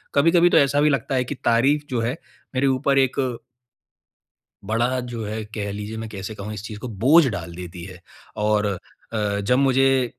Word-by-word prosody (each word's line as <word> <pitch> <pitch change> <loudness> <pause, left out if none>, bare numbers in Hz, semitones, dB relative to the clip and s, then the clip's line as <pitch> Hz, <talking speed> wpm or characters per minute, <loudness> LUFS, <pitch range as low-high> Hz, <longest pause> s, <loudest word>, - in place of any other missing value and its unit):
कभी-कभी 170 +4 +5
तो - - +4
ऐसा 140 +1 +3
भी 150 - +4
लगता 140 -1 -1
है 130 - +2
कि 145 - -5
तारीफ़ 135 +6 +3
जो 125 -3 -1
है 120 +6 -2 0.4
मेरे 135 +2 +2
ऊपर 135 +1 +2
एक 130 0 +1 1.5
बड़ा 120 +4 0
जो 120 -3 -5
हैं 110 +1 -4
कह 100 -2 -3
लीजिए 105 +2 -6
मैं 110 0 -6
कैसे 100 +1 -7
कहूँ 105 +1 -6
इस 105 -2 -7
चीज़ 105 -1 -7
को 125 - -6 0.2
बोझ 155 +5 +7
डाल 85 -7 -5
देती 90 -1 -8
हैं 90 -1 -10 0.4
और 105 0 +2
अ, 100 +1 -4
जब 125 +5 +2
मुझे 135 -1 +3
115 Hz, 190 wpm, -23 LUFS, 105-135 Hz, 1.5 s, बोझ